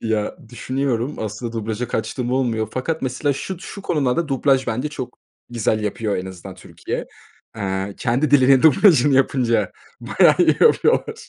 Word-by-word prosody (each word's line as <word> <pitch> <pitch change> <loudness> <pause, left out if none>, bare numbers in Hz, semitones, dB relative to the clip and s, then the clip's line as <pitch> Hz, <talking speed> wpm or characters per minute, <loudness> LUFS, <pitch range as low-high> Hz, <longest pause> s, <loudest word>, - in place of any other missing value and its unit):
Ya, 110 -2 -2
düşünüyorum, 130 +2 -2
aslında 110 +2 -5
dublaja 115 +1 -4
kaçtığım 120 +2 -3
olmuyor 115 -5 0
fakat, 155 +5 -3
mesela, 130 +3 -1
şud 180 +6 -6
şu 195 +1 -9
konularda 150 -2 0
dublaj 135 -1 +1
bence 125 +7 -2
çok 130 -4 -8 0.3
güzel 110 -2 -1
yapıyor 105 0 -2
en 90 - -4
azından 95 0 -10
Türkiye. 90 - -6 0.5
Eee, 95 -1 -3
kendi 130 +4 0
dilinin 135 -2 +5
dublajını 150 - +5
yapınca 120 -7 +1 0.3
bayağı - - +4
iyi - - +4
yapıyorlar. - - +2
125 Hz, 145 wpm, -20 LUFS, 110-135 Hz, 0.5 s, dilinin